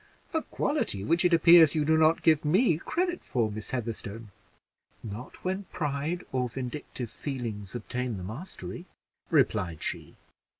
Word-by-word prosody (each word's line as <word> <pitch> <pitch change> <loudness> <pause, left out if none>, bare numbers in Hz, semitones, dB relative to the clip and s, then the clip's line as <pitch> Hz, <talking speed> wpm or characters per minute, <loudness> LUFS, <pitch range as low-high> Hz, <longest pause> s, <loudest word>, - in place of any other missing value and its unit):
"A 320 - +1
quality 235 - -1
which 170 - +2
it 180 - +4
appears 165 -2 +7
you 150 -1 +2
do 160 +1 +4
not 160 +1 +4
give 155 -2 +4
me 170 +2 +3
credit 355 - -1
for, 115 -4 0
Miss 105 0 -6
Heatherstone." 115 -3 -5 0.7
"Not 110 - -8
when 190 +2 -1
pride 150 +2 -2
or 125 -1 0
vindictive 125 -1 -5
feelings 115 -8 -5
obtain 120 0 -3
the 90 - -6
mastery," 165 - -7 0.4
replied 105 - +1
she. - - -4
140 Hz, 140 wpm, -28 LUFS, 115-170 Hz, 0.7 s, appears